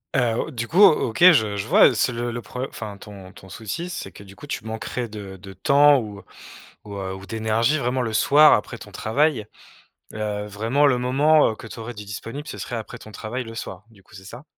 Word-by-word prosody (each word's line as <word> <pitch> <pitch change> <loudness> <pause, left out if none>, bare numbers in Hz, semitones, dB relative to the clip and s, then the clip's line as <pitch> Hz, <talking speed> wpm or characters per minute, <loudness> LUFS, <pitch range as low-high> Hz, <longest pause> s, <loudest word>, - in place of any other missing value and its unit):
Heu, 120 -3 +2
O 155 - -8
du 120 -2 -4
coup, 180 - 0
O 160 - +6
OK 110 - -7
je 110 -7 +1
je 100 - -4
vois - - +6
c'est - - +1
le 120 0 -3
le 120 +1 -5
pro 125 +3 -6
enfin, 105 -2 -8
ton 100 -2 -12
ton 95 - -15
souci 115 - -6
c'est - - -6
que, 100 - -13
du 100 0 -15
coup 145 - -12
tu 110 - -5
manquerais 110 +2 -4
de 100 -3 -9
de 95 +1 -12
temps 140 +7 +4
ou, 105 -3 -7
heu, - - -15 0.6
ou, 100 -1 -9
heu, 95 -1 -4
ou 95 - -11
d'énergie 110 +6 0
vraiment 125 -1 -1
le 115 -2 -2
soir 150 +6 +6
après - - -1
ton - - -13
travail. 135 0 0 0.7
Heu, 105 -1 -3
vraiment 115 +8 0
le 125 -3 +3
moment, 145 +5 +3
heu, - - -7
que - - -12
tu 115 - -10
aurais, 120 +2 -7
de 105 - -8
disponible 115 +8 -8
ce - - -7
serait 120 - -5
après 115 +1 -7
ton 110 - -13
travail, 115 +5 -5
le 115 0 -10
soir. 95 -3 -7
Du 100 -4 -21
coup, 105 - -23
c'est 95 -1 -12
ça? 120 +8 -11
115 Hz, 245 wpm, -22 LUFS, 105-130 Hz, 0.7 s, O